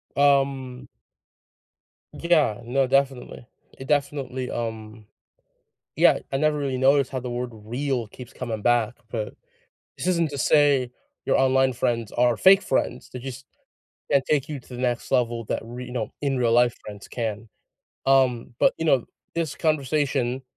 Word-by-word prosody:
Um 135 -3 +1 1.3
Yeah, 155 -11 +2
no, 130 +3 +1
definitely. 135 -2 0 0.3
It 135 - -9
definitely, 135 -3 -1
um 110 -2 -5 0.9
yeah, - - +5
I 135 - 0
never 150 +1 +1
really 135 -2 -2
noticed 135 0 +3
how 130 - -3
the 125 0 -5
word 125 0 -3
"real" 120 +3 -3
keeps 125 +2 -12
coming 115 -4 -5
back, 120 0 +2 0.2
but 110 -2 -4 0.6
this - - -4
isn't 170 -3 +2
to 140 - -5
say 140 -3 +3 0.3
your - - +2
online 130 0 +3
friends 115 -2 -1
are 120 -1 +2
fake 195 +1 +6
friends, 125 -5 -2
they 125 - -7
just 130 +1 -8 0.7
can't 140 -2 +3
take 145 -3 +1
you 150 -2 -4
to - - -22
the 120 - -6
next 120 -2 -1
level 120 -2 +1
that, - - -2
re 125 +2 -8
no, 120 -3 -3
in 135 -2 0
real 115 -2 +2
life 120 0 +4
friends 105 -2 -10
can, 110 -2 -4 0.6
um, 130 -3 +2
but, - - +5
you 165 - -2
know, 135 -6 +3 0.3
this 165 -4 -2
conversation 140 -4 0
130 Hz, 155 wpm, -24 LUFS, 120-140 Hz, 1.3 s, fake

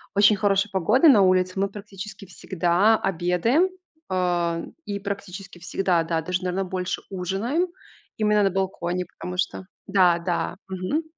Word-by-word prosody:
очень 205 +1 +6
хорошая 200 0 +1
погода 210 - +4
на 225 -8 +7
улице, 185 0 +2
мы 200 0 +1
практически 200 0 -9
всегда 185 +3 +2
обедаем, 195 - +1 0.4
а, 175 -2 0 0.2
и 200 -1 -3
практически 195 -2 -7
всегда, 180 -1 0
да, 165 0 -1
даже, 180 +3 -2
наверно, 185 +1 -1
больше 185 -1 -3
ужинаем 200 - -1 0.5
именно 210 -1 +3
на 195 - +3
балконе, 180 -1 -2
потому 180 +1 -8
что 185 0 -2 0.2
Да, 180 -3 +4
да. 175 +1 -2
Мгм. 190 - -2
190 Hz, 140 wpm, -24 LUFS, 180-200 Hz, 0.5 s, на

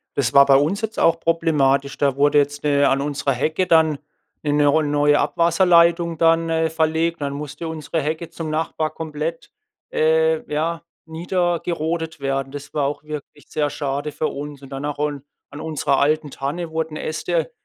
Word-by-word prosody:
Das 130 -4 0
war 140 0 +8
bei 135 -1 +5
uns 160 +10 +2
jetzt 220 0 -4
auch 165 0 +3
problematisch. 140 -5 +1
Da 140 -2 +1
wurde 145 +1 +3
jetzt 145 +1 -1
ne 145 -1 +3
an 135 +1 +1
unserer 140 -1 -1
Hecke 160 +8 0
dann 160 -3 +4 0.5
'ne 145 -1 0
'ne 145 0 +3
ro 155 +2 +4
neue 145 0 +3
Abwasserleitung 170 -1 +3
dann, 165 0 +3
äh, 160 0 +1
verlegt. 160 0 0
Dann 140 0 -2
musste 150 +3 -6
unsere 160 0 -3
Hecke 160 +3 -3
zum 160 -2 -6
Nachbar 155 0 -2
komplett 160 +1 -5 0.4
äh, 485 0 +2
ja, 165 +2 -1 0.2
niedergerodet 170 -1 -2
werden. 135 0 -2
Das 145 0 -9
war 145 -2 0
auch 145 +2 -3
wirklich 150 -1 -8
sehr 150 -1 0
schade 145 0 -3
für 150 +1 -2
uns. 145 0 -7
Und 135 - -12
danach 145 +2 -4
un 145 -2 -2 0.3
an 145 - -8
unserer 150 -3 0
alten 150 0 +1
Tanne 160 +5 -4
wurden 160 -1 -3
Äste 165 +6 -2
155 Hz, 175 wpm, -21 LUFS, 145-165 Hz, 0.5 s, war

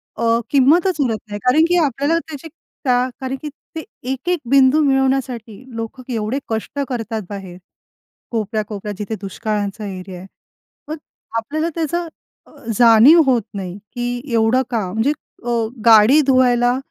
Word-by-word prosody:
अ, 235 - -2 0.2
किंमतच 320 +7 +4
उरत 235 -5 0
नाही. 205 0 -6
कारण 255 +6 +4
की 355 +1 +2
आपल्याला 285 +4 0
त्याची, 320 -2 -9 0.4
का 250 0 +2
कारण 260 0 -3
की 300 - -5 0.3
ते 320 - -4 0.3
एक-एक 345 +7 -1
बिंदू 275 +2 +5
मिळवण्यासाठी 265 -5 0 0.2
लोकं 230 +3 -6
एवढे 225 +4 -2
कष्ट 225 +5 -4
करतात 225 -3 -3
बाहेर. 195 -3 -8 0.7
कोपऱ्या, 215 -1 -1
कोपऱ्या 210 0 -6
जिथे 210 +2 -4
दुष्काळाचा 210 +1 -3
एरिया 185 -1 -7
आहे. 190 - -11 0.6
मग 310 - -5 0.4
आपल्याला 310 +9 -2
त्याचं 335 +1 -2 0.4
अ, - - -21 0.3
जाणीव 240 +8 +7
होत 245 -5 +2
नाही. 190 -1 -6 0.2
की 245 0 -3
एवढं 225 +3 +3
काम 215 -7 -2
म्हणजे 225 +7 +1 0.3
अ, 240 - -2 0.4
गाडी 230 +6 +7
धुवायला, 250 -1 +3
245 Hz, 140 wpm, -19 LUFS, 215-275 Hz, 0.7 s, जाणीव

